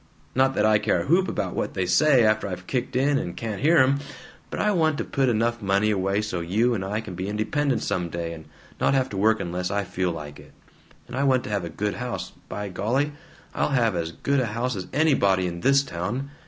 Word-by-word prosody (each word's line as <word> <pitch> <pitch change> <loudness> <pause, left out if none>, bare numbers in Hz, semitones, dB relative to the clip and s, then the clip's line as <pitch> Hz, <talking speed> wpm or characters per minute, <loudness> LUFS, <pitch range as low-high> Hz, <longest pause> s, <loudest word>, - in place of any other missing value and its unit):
Not 135 +1 +2
that 105 - +2
I 110 -1 +4
care 105 0 +1
a - - -8
whoop 180 +5 +3 0.2
what - - -3
they 95 - 0
say, 130 - +4
after 110 -1 +2
I've 90 -1 -6
kicked 125 +2 -2
in 140 +2 +3
and 85 - -5
can't 110 -3 -4
hear 160 +4 +4
'em, 135 0 +4 0.5
but - - -5
I 210 - +2
want 160 -5 +2
to - - -1
put 135 -2 +1
enough 115 0 0
money 100 +2 +2
away 100 +1 0
so 100 -5 -3
you 105 +9 +1
and 100 -5 -2
I 105 +3 -2
can 100 - -8
be 95 +2 -4
independent 125 +7 0
some 90 -2 -1
day, 85 0 -4
and 80 -1 -10 0.3
not - - +2
have 130 -1 +1
to 100 - -5
work 110 +3 +3
unless 90 +1 -3
I 100 0 0
feel 90 -1 -2
like 75 -3 -8
it, - - -16 0.5
and 120 - -7
I 135 - 0
want 130 -2 +3
to - - -6
have 100 -4 -1
a - - -5
good 105 +5 -2
house 125 -1 -4 0.2
by 105 0 -4
golly, 125 +10 0 0.4
I'll - - 0
have 120 -7 +2
as 85 -1 -2
good 140 +10 0
a 125 - 0
house 115 +3 -2
as 95 -2 -5
anybody 100 -11 +3
in 85 -1 -4
THIS 140 +4 +4
town! 120 +7 -4
110 Hz, 235 wpm, -25 LUFS, 95-130 Hz, 0.5 s, I